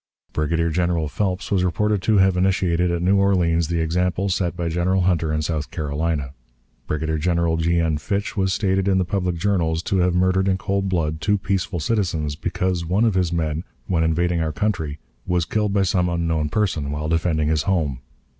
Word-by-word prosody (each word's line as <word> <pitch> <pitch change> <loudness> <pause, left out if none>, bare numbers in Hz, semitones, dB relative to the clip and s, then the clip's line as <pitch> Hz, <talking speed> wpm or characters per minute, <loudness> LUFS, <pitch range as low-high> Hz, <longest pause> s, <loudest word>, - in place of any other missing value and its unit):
Brigadier 80 +2 0
General 85 -1 0
Phelps 95 +5 -2
was 95 -3 +2
reported 105 +3 +1
to 110 +2 +2
have 95 -1 +4
initiated 90 -2 +1
at 85 0 -1
New 95 +2 +3
Orleans 85 -4 +2
the 85 0 -1
example 90 +4 0
set 90 -2 -1
by 85 -1 -2
General 90 +3 +1
Hunter 85 -3 +1
in 75 0 -1
South 75 -2 -2
Carolina. 75 -3 -2 0.5
Brigadier 80 0 -1
General 85 0 +1
G. 85 +1 +1
N. 80 -2 +1
Fitch 100 +6 -2
was 95 -2 +1
stated 95 0 +1
in 95 -1 +3
the 95 - +1
public 90 -1 -1
journals 85 -3 0
to 95 - 0
have 90 -1 +2
murdered 95 +1 +2
in 95 -1 +2
cold 100 0 -1
blood 80 -3 -1
two 105 +5 +2
peaceful 95 -2 -2
citizens, 80 -5 -1
because 90 +2 -2
one 95 +7 +1
of 110 - +2
his 90 -2 +1
men, 80 -1 -1 0.2
when 85 -3 +1
invading 85 +1 +1
our 80 -1 -1
country, 80 -6 -2 0.3
was 90 -2 +1
killed 105 +1 0
by 100 -1 +2
some 90 -1 +1
unknown 85 -3 0
person 80 -6 -1
while 75 +1 -3
defending 80 -1 +1
his 80 -1 +2
home. 75 -9 0
85 Hz, 190 wpm, -22 LUFS, 80-95 Hz, 0.5 s, have